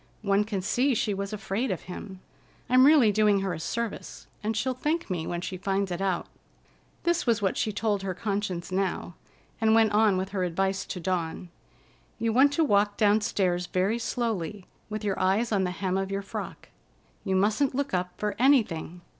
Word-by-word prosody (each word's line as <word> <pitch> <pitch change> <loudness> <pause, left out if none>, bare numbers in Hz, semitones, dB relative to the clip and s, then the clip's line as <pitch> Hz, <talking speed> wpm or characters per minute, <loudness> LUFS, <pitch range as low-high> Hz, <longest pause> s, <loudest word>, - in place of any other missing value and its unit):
One 200 0 +2
can 200 -4 -3
see 255 +6 +2
she 210 -1 0
was 200 0 -4
afraid 215 +4 -2
of 185 - -2
him. 185 +1 -9 0.5
I'm 255 +2 +7
really 285 -8 +6
doing 205 -1 +3
her 190 -2 -1
a 160 - -5
service, 230 +7 -4 0.2
and 220 +1 -1
she'll 260 +4 0
thank 300 - -2
me 165 -3 -2
when 175 0 -3
she 185 0 -5
finds 195 +1 -1
it 175 +2 -3
out." 190 -2 0 0.8
This 345 -3 +1
was 230 -3 +3
what 195 -2 0
she 220 - 0
told 210 -1 -1
her 190 -2 -3
conscience 195 -3 -3
now, 185 -2 -1 0.5
and 220 0 +4
went 225 -2 +4
on 210 -2 +4
with 190 +1 -2
her 190 -2 -2
advice 190 +2 -1
to 180 - -5
Dawn. 175 0 -3 0.7
"You 230 -1 0
want 270 +4 +5
to 325 - +2
walk 205 -6 +2
downstairs 205 -4 +2
very 195 +6 0
slowly, 210 -6 -3 0.2
with 215 0 -4
your 200 -2 -1
eyes 195 +6 +1
on 195 -3 +2
the - - -1
hem 185 +1 -1
of 195 0 -2
your 195 0 -3
frock. 195 - -7 0.5
You 190 -2 0
mustn't 215 +8 +2
look 280 -2 -2
up 180 0 0
for 210 0 -1
anything." 210 - +2
200 Hz, 190 wpm, -27 LUFS, 185-225 Hz, 0.8 s, I'm